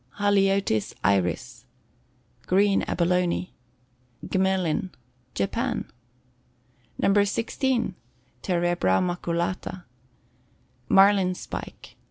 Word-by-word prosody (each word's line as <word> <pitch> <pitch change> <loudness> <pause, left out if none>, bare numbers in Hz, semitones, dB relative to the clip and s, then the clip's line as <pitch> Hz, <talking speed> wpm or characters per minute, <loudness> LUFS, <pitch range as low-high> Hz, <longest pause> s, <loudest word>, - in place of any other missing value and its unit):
Haliotis 195 - +1
Iris. 100 +5 0 0.8
Green 195 +1 +3
Abalone. 180 +1 0 0.7
Gmelin. 190 -2 0 0.5
Japan. 100 0 -2 1.1
No. 200 +1 +3
16. 235 +2 -1 0.5
Terebra 175 - +1
Maculata. 175 +1 -2 1.1
Marlin 195 -2 +5
Spike. - - -8
185 Hz, 60 wpm, -25 LUFS, 170-195 Hz, 1.1 s, Marlin